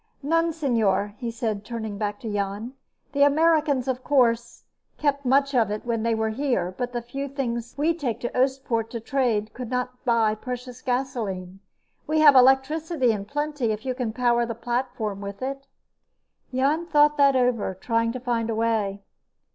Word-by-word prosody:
"None, 330 +3 +2
señor," 225 - +1
he 240 -3 -4
said, 225 -3 -3
turning 220 -3 -5
back 205 -1 -2
to 220 -3 -4
Jan. 205 +4 -3 0.4
"The 280 0 -1
Americans, 295 -2 +3
of 255 -1 -2
course, 235 -4 +1 0.3
kept 280 -2 0
much 275 +2 +3
of 235 -4 +3
it 210 +2 -4
when 230 -2 -1
they 230 0 +1
were 220 0 0
here, 220 -8 -1
but 245 -1 -3
the 240 -1 -4
few 275 +4 -5
things 240 -4 -4
we 310 +4 +2
take 260 -9 -3
to 240 - -4
Oostpoort 255 -3 0
to 235 - -5
trade 225 -3 0
could 250 -2 -6
not 250 0 -3
buy 230 -3 +3
precious 250 +2 -7
gasoline. 220 -8 -3 0.5
We 310 +1 +1
have 295 -2 +9
electricity 265 +2 +4
in 205 -2 -3
plenty 290 -2 -2
if 215 +3 -5
you 260 - 0
can 250 -3 -3
power 240 0 +2
the 230 -1 -3
platform 235 -4 -3
with 200 +3 -6
it." 275 +1 -4 0.8
Jan 285 +6 +1
thought 295 -2 +4
that 280 -1 +5
over, 245 -6 +1
trying 230 +4 0
to 255 - -4
find 235 -2 -1
a 225 - -1
way. 215 -3 0
245 Hz, 175 wpm, -25 LUFS, 225-275 Hz, 0.8 s, have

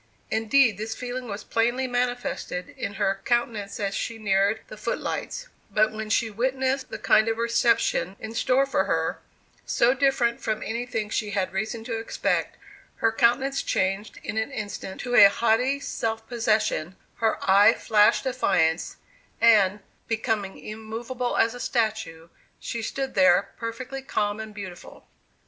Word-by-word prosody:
Indeed 225 -1 +3
this 220 +1 -4
feeling 250 0 -5
was 205 -1 -6
plainly 240 +3 0
manifested 245 -7 -2
in 200 - -6
her 195 -1 0
countenance 230 -5 -1
as 200 -1 -1
she 230 +2 -3
neared 200 0 +1
the - - -9
foot - - -2
lights; - - -4 0.2
but 215 +1 +2
when 215 0 -6
she 225 0 +1
witnessed 260 +3 -1
the - - -5
kind 215 - +4
of 225 0 0
reception 230 -4 +1
in 220 0 -7
store 255 +3 +2
for 275 - 0
her - - -1 0.4
so 240 +2 +3
different 265 -3 +1
from 215 -1 -2
anything 225 -2 -3
she 215 -2 -1
had 195 -2 -1
reason 215 +3 -3
to 230 -1 -3
expect 225 - -1 0.4
her 225 - +1
countenance 265 +5 +2
changed 195 +3 -1
in 210 - -4
an 220 +5 -2
instant 205 -5 -6
to 245 - -4
a 200 -5 +9
haughty 235 +6 +1
self 225 -5 -3
possession, 215 -7 0 0.2
her 225 -1 +1
eye 200 +3 +7
flashed 210 -1 +3
defiance, 175 -11 +1 0.4
and, 210 -3 +5 0.3
becoming 220 -3 -1
immovable 230 +3 -4
as 230 - +3
a 245 - -8
statue, 220 -10 -2 0.3
she 235 - -4
stood 270 +4 -3
there, 185 0 +4
perfectly 250 +4 -5
calm 210 -5 -1
and 220 -1 -8
beautiful. 185 -4 -9
225 Hz, 150 wpm, -25 LUFS, 205-245 Hz, 0.4 s, a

